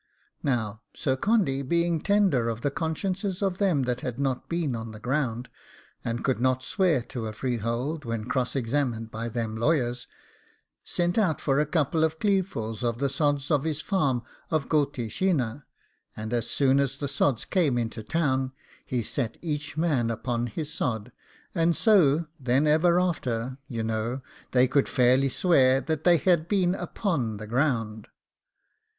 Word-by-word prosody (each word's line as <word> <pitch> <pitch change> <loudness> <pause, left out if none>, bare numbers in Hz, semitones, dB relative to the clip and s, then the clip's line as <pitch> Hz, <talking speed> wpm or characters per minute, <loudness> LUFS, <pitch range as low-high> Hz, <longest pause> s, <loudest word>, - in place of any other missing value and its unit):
Now, 110 -5 -1
Sir 130 -2 0
Condy 180 - +1
being 170 +3 +1
tender 195 - +2
of 115 0 -4
the 145 - 0
consciences 185 +5 -2
of 190 -2 0
them 180 -9 +2
that 125 0 -2
had 125 -2 -4
not 135 -2 -2
been 165 -7 -1
on 115 0 -5
the 110 - -9
ground, 125 -1 -1 0.6
and 115 0 -2
so - - -8
could 130 -3 +1
not 130 0 +2
swear 170 - +1
to 115 -2 -5
a 110 - -5
freehold 120 +6 -2
when 115 -3 -3
cross 125 +1 -1
examined 120 -3 -1
by 115 +1 -4
them 115 -1 -3
lawyers, 120 -1 0 0.8
sent 175 +4 0
out 180 -8 +2
for 140 -1 +1
a 150 - +1
couple 155 0 +1
of 160 0 +1
cleavesful 175 - -1
of 115 -1 0
the 140 +2 0
sods 145 +1 0
of 145 -3 +3
his 155 -2 -1
farm 140 - 0 0.3
of 155 -3 0
Gulteeshinnagh; 140 - 0 0.6
and 110 +2 -4
as 120 -1 -1
soon 135 -1 +3
as 135 -1 0
the 140 - -3
sods 140 -3 0
came 155 -10 +1
into 115 -1 -2
town, 130 0 0 0.3
he 125 -2 -2
set 120 0 -2
each 150 -2 -3
man 145 -8 +1
upon 120 +1 -2
his 150 +7 -5
sod, 110 -3 -2 0.4
and 165 -1 +2
so 170 -8 +4
then, 130 +2 +2
ever 170 +4 +4
after, 130 -8 -1
you 115 -3 -3
know, 115 +4 -2 0.3
they 125 0 +4
could 135 +2 +2
fairly 130 +2 +4
swear 135 -5 +4
they 165 +4 +2
had 170 0 +2
been 185 -3 +2
upon 145 - -2
the 110 - -7
ground. 115 -3 -1
135 Hz, 165 wpm, -27 LUFS, 120-160 Hz, 0.8 s, so